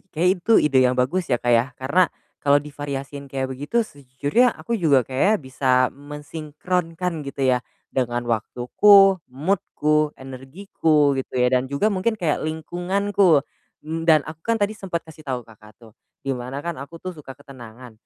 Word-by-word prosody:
kayaknya 180 Hz, -1 st, -1 dB
itu 230 Hz, -, +1 dB
ide 135 Hz, -3 st, +3 dB
yang 125 Hz, 0 st, +3 dB
bagus 160 Hz, +9 st, 0 dB
ya, 125 Hz, -, +2 dB
Kak, 120 Hz, 0 st, 0 dB
ya, 115 Hz, 0 st, +4 dB
karena 155 Hz, +7 st, +2 dB, 0.3 s
kalau 140 Hz, 0 st, +4 dB
divariasiin 140 Hz, -1 st, -5 dB
kayak 130 Hz, -1 st, -3 dB
begitu 145 Hz, -, -1 dB
sejujurnya 145 Hz, -, 0 dB
aku 235 Hz, -, -6 dB
juga 140 Hz, -8 st, +3 dB
kayaknya 140 Hz, -, +2 dB
bisa 130 Hz, +1 st, -6 dB, 0.3 s
mensinkronkan 160 Hz, +4 st, -4 dB
gitu 140 Hz, 0 st, -5 dB
ya 125 Hz, -, +2 dB, 0.3 s
dengan 120 Hz, -2 st, -1 dB
waktuku, 180 Hz, -, +4 dB
mood-ku, 150 Hz, 0 st, 0 dB
energiku, 145 Hz, +3 st, 0 dB
gitu 130 Hz, -, -10 dB
ya, 125 Hz, 0 st, +2 dB
dan 130 Hz, +1 st, +1 dB
juga 145 Hz, +11 st, +1 dB
mungkin 200 Hz, +4 st, 0 dB
kayak 165 Hz, -7 st, 0 dB
lingkunganku. 175 Hz, +1 st, +1 dB, 0.4 s
Mmm, 165 Hz, +2 st, -4 dB
dan 155 Hz, -1 st, +7 dB
aku 155 Hz, +1 st, -9 dB
kan 230 Hz, +6 st, 0 dB
tadi 205 Hz, -1 st, 0 dB
sempat 190 Hz, -5 st, -5 dB
kasih 160 Hz, -1 st, -14 dB
tahu 125 Hz, -3 st, -3 dB
Kakak 105 Hz, -1 st, -18 dB
tuh, 115 Hz, -2 st, -17 dB, 0.3 s
di 135 Hz, -, 0 dB
mana 130 Hz, +3 st, -6 dB
kan 170 Hz, 0 st, -2 dB
aku 140 Hz, +5 st, -9 dB
tuh 185 Hz, +2 st, -6 dB
suka 135 Hz, -4 st, -11 dB
ketenangan, 125 Hz, -3 st, -12 dB
145 Hz, 165 wpm, -22 LUFS, 130-175 Hz, 0.4 s, dan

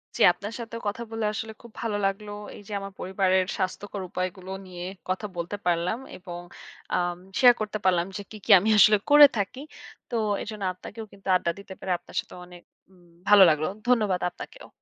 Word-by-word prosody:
জ্বী। -, -, -4 dB
আপনার 205 Hz, +3 st, -7 dB
সাথেও 230 Hz, 0 st, -6 dB
কথা 215 Hz, +3 st, -3 dB
বলে, 225 Hz, -1 st, -2 dB
আসলে 220 Hz, +1 st, -4 dB
খুব 235 Hz, -2 st, -14 dB
ভালো 215 Hz, -3 st, -1 dB
লাগলো। 205 Hz, +1 st, -2 dB, 0.2 s
এই -, -, -11 dB
যে -, -, -11 dB
আমার 195 Hz, 0 st, -7 dB
পরিবারের 190 Hz, 0 st, +1 dB
স্বাস্থ্যকর 195 Hz, +1 st, -3 dB
উপায়গুলো 185 Hz, +1 st, -4 dB
নিয়ে 180 Hz, -1 st, -7 dB, 0.2 s
কথা 185 Hz, +2 st, -1 dB
বলতে 170 Hz, +4 st, -3 dB
পারলাম 175 Hz, +6 st, +1 dB, 0.2 s
এবং 175 Hz, -1 st, -8 dB, 0.6 s
আম 175 Hz, -1 st, 0 dB, 0.2 s
শেয়ার 250 Hz, -2 st, +8 dB
করতে 215 Hz, 0 st, -2 dB
পারলাম, 175 Hz, -2 st, +3 dB
যে 205 Hz, -, -5 dB
কি, 215 Hz, -, -8 dB
কি -, -, +2 dB
আমি 215 Hz, +4 st, 0 dB
আসলে 210 Hz, 0 st, +7 dB
করে 295 Hz, 0 st, +10 dB
থাকি। 205 Hz, +7 st, -3 dB, 0.5 s
তো 240 Hz, -, -3 dB, 0.3 s
এজন্য 215 Hz, -2 st, -6 dB
আপনাকেও 220 Hz, +4 st, -9 dB
কিন্তু 195 Hz, 0 st, -15 dB
আড্ডা 170 Hz, -1 st, +1 dB
দিতে 200 Hz, -1 st, -10 dB
পেরে, 190 Hz, -, -4 dB
আপনার -, -, -16 dB
সাথেও, -, -, -8 dB
অনেক 175 Hz, -1 st, -13 dB, 0.3 s
উম 180 Hz, -2 st, -22 dB, 0.3 s
ভালো 205 Hz, -2 st, +9 dB
লাগলো। 155 Hz, 0 st, +1 dB, 0.2 s
ধন্যবাদ 210 Hz, -7 st, +2 dB
আপনাকেও। -, -, -11 dB
195 Hz, 185 wpm, -26 LUFS, 180-215 Hz, 0.6 s, করে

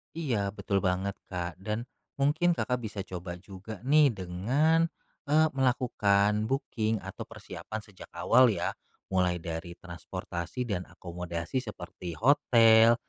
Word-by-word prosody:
Iya, 115 Hz, -12 st, -1 dB
betul 100 Hz, -2 st, 0 dB
banget 95 Hz, +1 st, 0 dB
Kak 90 Hz, -2 st, -4 dB
dan 105 Hz, +4 st, -3 dB, 0.3 s
mungkin 155 Hz, +5 st, +2 dB
Kakak 125 Hz, -6 st, -1 dB
bisa 105 Hz, -4 st, -5 dB
coba 90 Hz, -2 st, -6 dB
juga 95 Hz, +3 st, -10 dB
nih 150 Hz, +3 st, +6 dB
dengan, 125 Hz, -, +2 dB, 0.4 s
eee, 155 Hz, +2 st, +5 dB
melakukan 105 Hz, -6 st, +2 dB
booking 115 Hz, -5 st, -1 dB
atau -, -, -6 dB
persiapan 110 Hz, -, -7 dB
sejak 100 Hz, -3 st, -13 dB
awal 115 Hz, +9 st, +5 dB
ya, 110 Hz, -, 0 dB, 0.4 s
mulai 90 Hz, -1 st, +2 dB
dari 85 Hz, +1 st, -5 dB
transportasi 90 Hz, +4 st, -5 dB
dan 95 Hz, -5 st, -2 dB
akomodasi 85 Hz, +4 st, -4 dB
seperti 90 Hz, -5 st, -7 dB
hotel, 115 Hz, -, +6 dB
105 Hz, 125 wpm, -29 LUFS, 90-125 Hz, 0.4 s, nih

